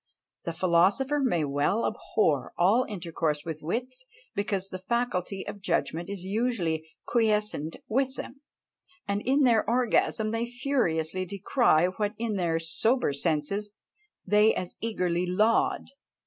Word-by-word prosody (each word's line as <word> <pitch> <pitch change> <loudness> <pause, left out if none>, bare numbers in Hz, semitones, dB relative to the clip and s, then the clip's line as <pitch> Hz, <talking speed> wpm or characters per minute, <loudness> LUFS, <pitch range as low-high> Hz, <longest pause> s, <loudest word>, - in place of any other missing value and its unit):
The 170 - -2
philosopher 190 - +2
may 205 - +1
well 145 +10 +1
abhor 150 - 0
all 205 +9 +4
intercourse 165 -6 -2
with 160 -2 -5
wits! 250 +10 -4 0.3
because 195 -1 -2
the 185 - -6
faculty 195 -3 -2
of 200 - -7
judgment 170 -1 -1
is 200 -3 -5
usually 190 -7 -1 0.2
quiescent 210 -9 0
with 265 +3 0
them; 270 0 -8 0.7
and 200 +1 -1
in 275 +5 +2
their 235 -4 +4
orgasm 230 -2 +2
they 230 +1 -1
furiously 185 - 0
decry 200 - +2
what 205 +3 -2
in 225 -2 -2
their 170 -3 0
sober 195 - +1
senses 170 +8 -1 0.5
they 210 +3 +4
as 180 - -3
eagerly 180 -5 -1
laud! 215 +9 +2
200 Hz, 130 wpm, -28 LUFS, 170-230 Hz, 0.7 s, all